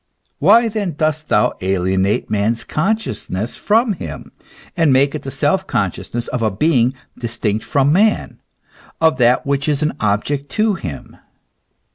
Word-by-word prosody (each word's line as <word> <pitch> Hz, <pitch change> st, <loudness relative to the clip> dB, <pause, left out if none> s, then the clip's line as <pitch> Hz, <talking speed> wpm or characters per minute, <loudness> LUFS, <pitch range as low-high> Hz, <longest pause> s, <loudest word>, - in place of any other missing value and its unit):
Why 225 Hz, +9 st, +5 dB
then 205 Hz, -5 st, -2 dB
dost 155 Hz, 0 st, -1 dB
thou 105 Hz, -, +3 dB
alienate 95 Hz, +1 st, 0 dB
man's 110 Hz, +2 st, 0 dB
consciousness 150 Hz, -, -2 dB
from 225 Hz, +1 st, +2 dB
him, 170 Hz, -, -8 dB, 0.4 s
and 165 Hz, -4 st, +3 dB
make 140 Hz, +2 st, +3 dB
it 155 Hz, -, -4 dB
the 135 Hz, -, -6 dB
self -, -, 0 dB
conscious -, -, -2 dB
ness 120 Hz, 0 st, -3 dB
of 125 Hz, -, -3 dB
a 110 Hz, -, +2 dB
being 125 Hz, +3 st, +2 dB, 0.2 s
distinct 115 Hz, -3 st, -2 dB
from 140 Hz, +1 st, +2 dB
man, 210 Hz, +4 st, +1 dB, 0.6 s
of 160 Hz, -2 st, +3 dB
that 125 Hz, +1 st, +3 dB
which 140 Hz, +1 st, 0 dB
is 145 Hz, 0 st, 0 dB
an 150 Hz, -, 0 dB
object 125 Hz, +8 st, -1 dB
to 215 Hz, 0 st, +2 dB
him 75 Hz, -, -7 dB
140 Hz, 150 wpm, -18 LUFS, 110-165 Hz, 0.6 s, Why